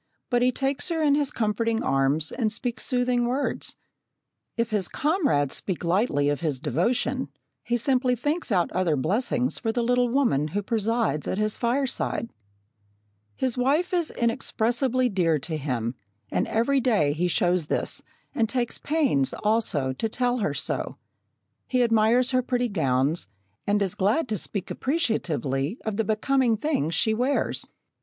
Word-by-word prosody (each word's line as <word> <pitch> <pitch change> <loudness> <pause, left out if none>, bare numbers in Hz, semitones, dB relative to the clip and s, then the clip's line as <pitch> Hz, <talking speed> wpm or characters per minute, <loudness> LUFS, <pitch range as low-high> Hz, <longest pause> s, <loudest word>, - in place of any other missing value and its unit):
But 245 0 +3
he 250 +1 +4
takes 270 +6 -1
her 330 -1 -1
in 300 -2 +3
his 285 -1 +1
comforting 225 +1 0
arms 135 +3 +1
and 225 -4 0
speaks 240 +2 -1
soothing 245 -2 +1
words. 265 +4 -2 0.8
If 230 -1 0
his 200 -4 0
comrades 285 - +1
speak 185 -3 -2
lightly 170 - +1
of 145 - 0
his 155 -5 0
devotion, 230 - 0 0.3
he 240 - 0
simply 250 +1 +2
thinks 295 +4 -1
out 180 -4 +2
other 180 -4 +1
blessings 235 - 0
for 225 - -1
the 240 +1 -1
little 245 +1 +2
woman 235 - +2
who 205 - -1
presides 225 -6 0
at - - -1
his 215 0 0
fireside. 240 -1 -1 1.0
His 255 -1 -1
wife 300 +9 +1
is 345 -3 +1
inexpressibly 240 +2 0
dear 175 -7 +2
to 155 +3 -4
him, 125 -6 -2 0.4
and - - 0
every 250 +5 +2
day 210 - +2
he 175 +4 0
shows 175 -1 +1
this, - - -1 0.3
and 225 -2 +1
takes 245 -2 -1
pains, 270 - +1
also, 210 -12 +1
to 225 - -2
tell 245 +2 0
her 155 -9 -1
so. 140 - -3 0.7
He 250 -1 +2
admires 230 +2 +3
her 255 -1 +3
pretty 245 -1 0
gowns, 140 - +1 0.4
and 205 0 +3
is 190 - -1
glad 215 +11 +1
to 215 - 0
speak 195 +1 -4
appreciatively 180 - -1
of 215 -2 -2
the 225 - +2
becoming 230 +2 +1
things 205 - -1
she 220 +6 +2
wears. 250 +5 0
225 Hz, 155 wpm, -25 LUFS, 175-255 Hz, 1.0 s, he